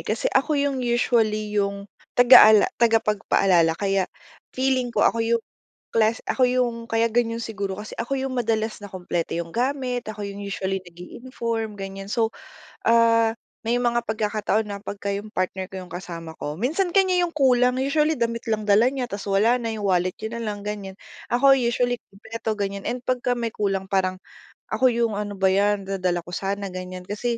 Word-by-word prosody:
kasi - - -2
ako 305 -2 +2
'yong 280 -2 0
usually 225 -3 +1
'yong, 200 -1 -1 0.3
tagaala 220 -4 +8 0.2
tagapagpaalala 195 -7 +3
kaya 195 -1 0 0.5
feeling 260 -1 +1
ko, 235 - +1
ako 230 - +2
'yong 230 0 +1 0.5
class 225 0 +2
ako 260 - +2
'yong 240 -2 -1
kaya 225 0 +2
ganyan 230 -1 +1
siguro, 200 -4 -4
kasi 210 +1 -8
ako 275 +4 -2
'yong 265 0 -3
madalas 225 -3 -1
na 205 - -8
kumpleto 175 -3 -3
'yong 170 -1 -4
gamit, 250 -1 -1
ako 210 -1 -5
'yong 200 0 -6
usually 195 -1 -3
nag-i-inform, 225 +5 -5
ganyan. 195 0 -7
So, 225 +1 0 0.5
ah, 230 -1 +4 0.3
may 235 +2 +1
mga 240 -1 +1
pagkakataon 215 0 -1
na 200 - -4
pagka 200 -1 -5
'yong 210 +2 -9
partner 185 +1 -2
ko 190 -1 -7
'yong 180 - -11
kasama 165 -2 -7
ko, 150 - -4
minsan 330 - 0
kaniya 370 -2 +3
'yong 340 - -7
kulang, 250 -3 +3
usually 300 +2 +1
damit 230 0 -1
lang 215 -2 -1
dala 205 +3 +6
niya, 255 -3 -3
tas 200 -1 -6
wala 210 +5 +3
na, 230 -2 -3
'yong 210 -2 -4
wallet 180 0 +1
niya 220 +2 -4
na - - -5
lang, 205 -1 -4
ganyan. 205 -2 -5 0.4
Ako 270 +2 +6
usually, 245 0 +1 0.2
kumpleto 220 +2 -4
ganyan, 200 -1 -4
and 250 0 -3
pagka 250 -1 0
may 235 -1 -2
kulang 195 -2 -2
parang, 185 -1 0 0.6
ako 255 - +4
'yong, 235 -2 0
"Ano 205 -1 -4
ba 190 0 +3
'yan, 200 0 +1
dadala 180 -3 -1
ko 175 - -10
sana", 200 +2 -2
ganyan 185 0 -7
kasi, 230 +4 -2
220 Hz, 180 wpm, -24 LUFS, 195-240 Hz, 0.6 s, tagaala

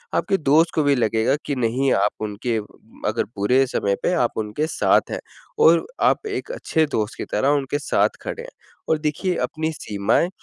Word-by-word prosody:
आपके 195 - +1
दोस्त 155 +2 +3
को 155 - +3
भी 140 -1 +3
लगेगा 115 +2 +2
कि 145 - -2
नहीं 125 +2 +1
आप 100 +1 +2 0.2
उनके 110 +3 -2 0.5
अगर - - 0
बुरे 125 +7 +3
समय 100 -4 0
पे 180 - +2
आप 120 - -5
उनके 110 +9 -2
साथ - - +2
हैं, - - -2 0.4
और 165 +1 +5 0.2
आप 435 - +2
एक 410 +3 -4
अच्छे 160 - 0
दोस्त 105 +1 -2
की - - -4
तरह 135 - +2
उनके 145 +2 -3
साथ - - +2
खड़े 470 - -5
हैं। - - -9 0.4
और 160 - +3
देखिए 160 +4 -1
अपनी 160 0 -2
सीमाएँ, 105 - 0
140 Hz, 185 wpm, -22 LUFS, 110-160 Hz, 0.5 s, और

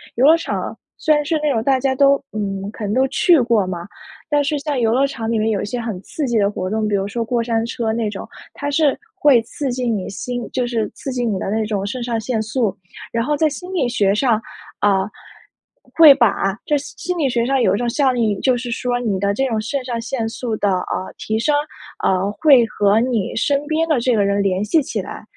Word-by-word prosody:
游 250 - +3
乐 315 +3 +8
场 - - -4 0.2
虽 310 - +2
然 295 - +1
是 320 +1 +1
那 300 - +2
种 225 - 0
大 270 +1 +3
家 265 0 +1
都 275 +1 +5 0.2
嗯， 195 -2 -3
可 215 - -8
能 205 - -1
都 260 +3 +3
去 340 +2 +4
过 230 -4 +2
嘛， 175 -2 -5 0.4
但 295 -1 +3
是 295 +1 -1
像 290 -1 -2
游 225 -1 +2
乐 265 +3 +3
场 230 -5 -5
里 230 - +1
面 220 +1 +1
有 200 - -1
一 - - -3
些 240 +4 -4
很 220 -6 -5
刺 300 +8 -4
激 235 -2 +1
的 200 -1 +3
活 185 -2 -4
动， 215 +1 -1
比 205 - 0
如 195 -1 0
说 230 +3 -2
过 235 +1 0
山 230 -1 0
车 230 -1 -2
那 225 -2 -1
种， 205 - -7 0.3
它 285 0 -4
是 285 -1 +2 0.2
会 290 - +4
刺 260 +4 -4
激 250 -1 -2
你 205 -5 -2
心 245 +3 -5
就 250 - 0
是 235 -3 -1
刺 270 - -5
激 245 -1 -2
你 210 -4 0
的 195 - -3
那 220 +1 0
种 205 -2 -2
肾 245 +5 -4
上 235 -1 -2
腺 220 0 -2
素。 215 -2 -1 0.3
然 230 0 -1
后 295 +2 +1
在 310 +1 +2
心 360 +5 -8
理 275 -9 +1
学 200 -4 +2
上， 225 -1 +2 0.4
啊， 195 -2 +2 0.9
会 315 -3 +9
把 200 -5 +1
这 300 - +1
心 285 +1 -8
心 360 0 -1
理 280 -4 +2
学 235 -2 0
上 265 0 +1
有 190 -3 +3
一 - - -1
种 240 +1 -1
效 260 +1 +1
应， 215 -5 0
就 255 -2 +2
是 240 0 -5
说 245 0 -1
你 210 -6 -1
的 200 +1 +1
这 270 +6 0
种 220 -3 -1
肾 265 +5 -3
上 240 -2 -3
腺 230 -1 -3
素 225 0 -3
的， 205 - +1
呃， 185 0 -3
提 220 0 -2
升， 290 +6 +1 0.5
呃， 190 +1 +1
会 275 -7 +6
和 205 0 +2
你 235 -5 -1
身 285 +4 +1
边 320 +1 0
的 305 -6 +2
这 245 0 +1
个 205 -2 +2
人 200 0 +1
联 195 0 0
系 310 +9 +3
起 230 -6 -3
来， 190 - -9
235 Hz, 265 characters per minute, -19 LUFS, 210-270 Hz, 0.9 s, 会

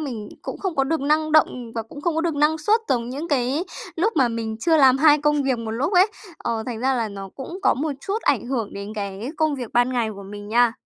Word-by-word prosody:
mình 235 -8 -5
cũng - - -6
không 380 -4 -3
có 270 - +3
được 320 +3 -1
năng 305 +2 +1
động 250 -6 +2
và 225 - -2
cũng 255 +6 -11
không 330 +2 0
có 325 - +1
được 330 -2 0
năng 300 +2 +2
suất 425 +9 +3
giống 240 -2 0
những 285 +6 -5
cái 275 +4 +1 0.3
lúc 415 +7 +1
mà 260 -4 +4
mình 225 -1 -3
chưa 330 -2 +3
làm 270 -3 +6
hai 300 0 +6
công 295 0 +2
việc 260 -3 0
một 225 -1 -4
lúc 250 - -1
ấy. 370 +3 +6 0.3
Ờ, 225 -1 -2
thành 235 -2 -4
ra 265 +1 +2
là 230 -3 -1
nó 195 -1 -7
cũng 335 +8 -7
có - - +4
một 295 +2 -2
chút 410 +7 -3
ảnh - - +1
hưởng 235 -5 -2
đến 200 +2 -7
cái 200 +4 -4
công 310 -2 +1
việc 245 -4 -6
ban 245 +1 +3
ngày 235 -3 0
của 200 - -9
mình 205 +1 -9
nha. 235 +1 +4
265 Hz, 265 wpm, -23 LUFS, 230-310 Hz, 0.3 s, làm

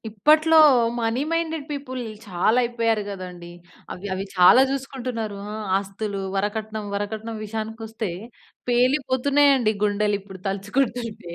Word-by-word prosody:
ఇప్పట్లో 310 +9 +4 0.4
money 230 +3 0
minded 325 -2 -1
people 275 -3 -5 0.3
చాలా 205 +5 +2
అయిపోయారు 230 -3 0
కదండీ. 180 -3 -8 0.4
అవి 195 +3 -8
అవి 190 +1 -3
చాలా 180 +9 +7
చూసుకుంటున్నారు. 255 -6 -4 0.2
ఆహ్, 215 0 -5
ఆస్తులు, 200 +1 -5 0.2
వరకట్నం, 215 +1 -3
వరకట్నం 220 +2 -4
విషయానికొస్తే 220 0 -5 0.6
పేలిపోతున్నాయండి 260 0 +3
గుండెలిప్పుడు 205 -2 -1
తలుచుకుంటుంటే. 210 -1 -2
220 Hz, 100 wpm, -23 LUFS, 205-255 Hz, 0.6 s, చాలా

